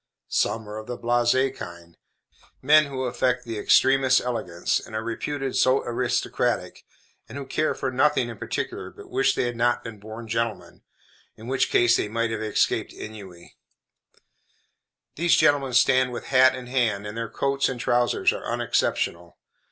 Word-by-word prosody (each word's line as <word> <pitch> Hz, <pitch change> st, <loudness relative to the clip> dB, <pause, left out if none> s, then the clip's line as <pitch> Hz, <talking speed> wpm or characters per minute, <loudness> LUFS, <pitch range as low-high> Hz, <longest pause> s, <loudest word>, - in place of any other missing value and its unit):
Some 110 Hz, -1 st, 0 dB
are 105 Hz, +1 st, -7 dB
of 110 Hz, -, -10 dB
the 125 Hz, -1 st, -5 dB
blasé 120 Hz, +3 st, +1 dB
kind; 85 Hz, -5 st, -10 dB, 0.6 s
men 155 Hz, +3 st, +5 dB
who 135 Hz, -2 st, -4 dB
affect 125 Hz, 0 st, 0 dB
the 115 Hz, -2 st, -5 dB
extremest 135 Hz, +3 st, +4 dB
elegance, 95 Hz, -9 st, -2 dB
and 110 Hz, -, -10 dB
are 110 Hz, -, -2 dB
reputed 135 Hz, +4 st, -4 dB
"so 130 Hz, +1 st, +3 dB
aristocratic," 120 Hz, +1 st, -1 dB, 0.4 s
and -, -, -8 dB
who 140 Hz, -, -6 dB
care 155 Hz, +3 st, -1 dB
for 130 Hz, -, -3 dB
nothing 135 Hz, -1 st, +2 dB
in 115 Hz, -3 st, -9 dB
particular, -, -, -4 dB
but -, -, -14 dB
wish 135 Hz, 0 st, +2 dB
they -, -, 0 dB
had 120 Hz, -1 st, -2 dB
not 120 Hz, +1 st, +1 dB
been 115 Hz, -3 st, -9 dB
born 110 Hz, +2 st, -9 dB
gentlemen, 115 Hz, -1 st, -3 dB, 0.5 s
in 110 Hz, -, -13 dB
which 130 Hz, +2 st, 0 dB
case 120 Hz, 0 st, +4 dB
they -, -, -1 dB
might 115 Hz, +1 st, -1 dB
have 110 Hz, -1 st, -3 dB
escaped 110 Hz, -1 st, 0 dB
ennui. 95 Hz, -5 st, -11 dB, 1.6 s
These 170 Hz, +2 st, +3 dB
gentlemen 140 Hz, -3 st, +2 dB
stand 130 Hz, +1 st, +4 dB
with 120 Hz, -, -6 dB
hat 130 Hz, 0 st, +6 dB
in 130 Hz, -1 st, -8 dB
hand, 120 Hz, -5 st, 0 dB
and 105 Hz, +1 st, -6 dB
their 115 Hz, -1 st, -4 dB
coats 140 Hz, 0 st, 0 dB
and 130 Hz, -2 st, -5 dB
trousers 120 Hz, 0 st, +2 dB
are -, -, -7 dB
unexceptionable. 85 Hz, 0 st, -1 dB
120 Hz, 165 wpm, -24 LUFS, 110-130 Hz, 1.6 s, hat